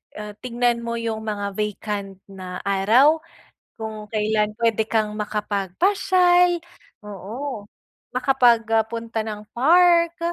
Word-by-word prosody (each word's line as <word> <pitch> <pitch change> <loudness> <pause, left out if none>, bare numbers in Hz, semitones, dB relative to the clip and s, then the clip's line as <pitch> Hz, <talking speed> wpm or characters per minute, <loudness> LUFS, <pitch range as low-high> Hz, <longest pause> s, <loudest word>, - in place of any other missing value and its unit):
ah, 210 0 -7
tignan 240 -1 0
mo 235 0 -4
iyung 230 -1 -3
mga 205 -2 -4
vacant 205 -1 -4 0.2
na 185 -1 -8
araw, 220 +11 +4 0.6
kung 220 -1 -7
kailan 210 0 0
puwede 225 -1 0
kang 220 -1 0
makapagpasyal. 350 - +1 0.4
Oo 210 +4 -7 0.5
makapag 250 -3 +3
ah, 225 - +5
punta 230 0 -4
ng 210 -1 -7
park, 340 +5 +4
220 Hz, 110 wpm, -22 LUFS, 210-255 Hz, 0.6 s, ah